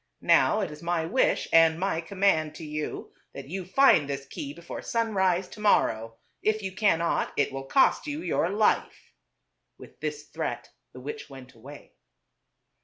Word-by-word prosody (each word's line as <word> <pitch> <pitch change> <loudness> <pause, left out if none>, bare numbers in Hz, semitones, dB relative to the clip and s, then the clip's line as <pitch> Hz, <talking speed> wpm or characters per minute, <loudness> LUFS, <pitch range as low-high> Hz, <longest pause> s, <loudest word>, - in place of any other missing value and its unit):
Now - - +4
it - - -3
is 150 +1 -11
my 170 -1 -1
wish 255 +10 +1
and 165 0 +5
my 185 -3 -1
command 165 -4 +1
to 160 - -8
you 150 0 -5 0.2
that 135 0 -9
you 190 +2 -4
find 185 - +4
this 140 -1 -4
key 140 - -7
before 170 +3 -8
sunrise 190 -6 0
to - - -12
morrow. 115 - +2 0.3
If 215 -1 0
you 190 - -3
cannot, 185 -4 +1
it 140 - +1
will 135 0 -6
cost 270 - +3
you 295 +3 -4
your 170 - 0
life." 210 +2 0 0.6
With - - -15
this 150 -1 -4
threat - - -5 0.2
the 125 - -11
witch 145 +2 -7
went 130 -1 -12
away. 135 +5 -13
165 Hz, 165 wpm, -27 LUFS, 145-195 Hz, 0.6 s, and